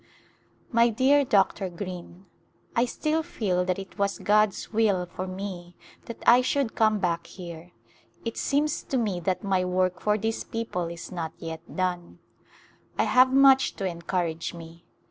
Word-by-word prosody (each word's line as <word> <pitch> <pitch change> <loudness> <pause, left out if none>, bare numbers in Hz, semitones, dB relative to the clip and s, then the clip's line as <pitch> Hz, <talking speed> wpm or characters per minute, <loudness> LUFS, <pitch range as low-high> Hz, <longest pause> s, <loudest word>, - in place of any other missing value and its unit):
My 235 0 +4
dear 265 +5 +4
Dr. 195 -4 +2
Greene: 180 0 -8 0.5
I 235 - +3
still 310 +5 -1
feel 200 - -1
that 185 0 0
it 195 0 -9
was 200 0 0
God's 210 0 +1
will 205 -5 +2
for 180 +1 -6
me 185 -2 -7 0.3
that 235 - -9
I 245 +1 +7
should 260 -1 0
come 215 -1 +3
back 170 -3 -1
here; 175 -1 -10 0.5
it 230 - -3
seems 295 +2 0
to 265 - -1
me 205 -7 0
that 185 +3 -2
my 190 -2 +1
work 185 0 0
for 210 0 +1
this 225 +2 -2
people 225 -7 -3
is 170 0 -8
not 165 -3 -4
yet 165 0 -8
done. 180 -2 -2 0.8
I - - +3
have 255 +1 +5
much 270 0 +5
to 195 - -4
encourage 170 -2 -2
me. 170 0 -12
190 Hz, 160 wpm, -26 LUFS, 175-230 Hz, 0.8 s, I